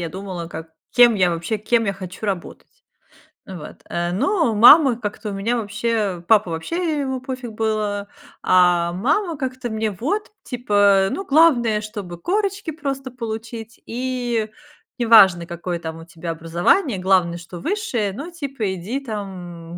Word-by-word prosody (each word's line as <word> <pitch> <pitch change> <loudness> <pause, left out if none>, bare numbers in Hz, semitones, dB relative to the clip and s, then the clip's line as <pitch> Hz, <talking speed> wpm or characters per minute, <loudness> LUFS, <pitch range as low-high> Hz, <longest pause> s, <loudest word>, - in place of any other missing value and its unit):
я 170 - -3
думала, 185 -1 -6
как 160 -1 -8 0.2
кем 240 -2 +6
я 185 -3 +3
вообще, 170 +6 -2
кем 230 +2 +1
я 200 - 0
хочу 190 +1 -9
работать, 200 - -6 0.6
э, 190 - -8
вот. 150 - -10
Э, 175 0 -2
но 315 - +1
мама 245 +3 +7
как-то 210 0 -4
у - - -5
меня, 205 +5 -1
вообще 210 -4 -2
папа 210 -5 +4
вообще 310 - -2
ему 265 -2 -2
пофиг 255 -3 -6
было, 215 -2 -2 0.3
а 175 -2 +4
мама 315 - 0
как-то 255 -3 -4
мне 220 0 -1
вот, 310 - -3
типа: 205 - +3
"Ну, 390 - -4
главное, 270 - +4
чтобы 205 -5 -7
корочки 395 - -1
просто 275 -4 -4
получить, 225 -1 -7
и 245 -2 -2 0.5
неважно, 200 -8 +6
какое 175 0 -4
там 160 -1 -7
у - - -10
тебя 170 0 -7
образование, 175 - +1
главное, 180 -2 +2
что 175 +1 -10
высшее", 245 - -1
ну, 285 - -7
типа 275 - -3
иди, 200 +10 -4
там 185 -8 -7
215 Hz, 150 wpm, -21 LUFS, 180-255 Hz, 0.6 s, мама